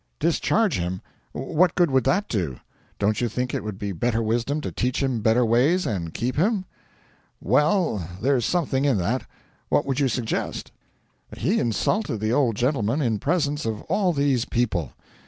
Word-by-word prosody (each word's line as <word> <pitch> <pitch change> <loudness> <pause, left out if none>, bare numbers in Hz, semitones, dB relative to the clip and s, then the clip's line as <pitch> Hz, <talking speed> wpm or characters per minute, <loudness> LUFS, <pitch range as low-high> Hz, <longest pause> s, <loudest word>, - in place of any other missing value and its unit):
'Discharge 180 - +1
him! 90 +1 -2 0.3
What 165 +6 +1
good 175 -5 +3
would 130 -2 +2
that 195 +10 +2
do? 85 - -2 0.4
Don't 105 +3 +1
you 120 - +1
think 125 +3 -3
it - - -2
would 105 -2 -5
be 100 0 -3
better 115 +5 0
wisdom 120 +6 0
to - - -4
teach 125 +2 -1
him 130 -4 0
better 115 +3 +3
ways 135 +11 +3
and 85 -6 -2
keep 125 - -3
him?' 195 +3 +1 0.7
'Well, 150 - +1
there's 130 +1 +2
something 140 -3 0
in 140 -6 +3
that. 110 +8 -1 0.4
What - - +2
would 135 0 -1
you 140 - +3
suggest?' 120 -3 -3 0.7
'He - - +1
insulted 120 - 0
the 110 +2 0
old 125 -5 +2
gentleman 120 +1 0
in 115 -7 0
presence 150 - 0
of 110 -2 -3
all 195 -4 +1
these 140 -6 +1
people. 105 - -1
125 Hz, 170 wpm, -24 LUFS, 110-150 Hz, 0.7 s, good